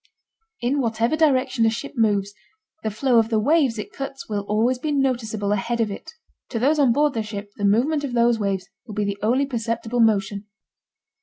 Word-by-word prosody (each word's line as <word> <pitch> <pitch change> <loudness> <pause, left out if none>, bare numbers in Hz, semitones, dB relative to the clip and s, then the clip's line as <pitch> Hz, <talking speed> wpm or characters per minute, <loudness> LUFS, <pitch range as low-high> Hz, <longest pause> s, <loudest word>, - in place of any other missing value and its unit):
In 265 +4 +1
whatever 230 +3 0
direction 265 -6 +2
a 225 - +5
ship 235 +5 -5
moves, 205 -4 +1 0.5
the 220 - -1
flow 235 +3 +2
of 225 0 +1
the 225 - +1
waves 270 0 +2
it 210 - -6
cuts 275 0 -6
will 205 -2 -2
always 235 +4 +1
be 300 +3 -2
noticeable 235 -7 0
ahead 230 +4 -1
of 220 -3 +1
it. 315 +10 -9 0.4
To 240 - -3
those 285 +6 +2
on 270 -4 +5
board 295 +3 +2
the 225 - -1
ship 205 -1 -7
the 205 - -1
movement 265 +9 +2
of 270 -4 -3
those 235 -1 +3
waves 195 -2 -2 0.2
will 215 - -8
be 210 - 0
the 200 0 -3
only 250 +6 +2
perceptible 230 -2 -3
motion. 205 -2 +1
230 Hz, 200 wpm, -23 LUFS, 210-265 Hz, 0.5 s, a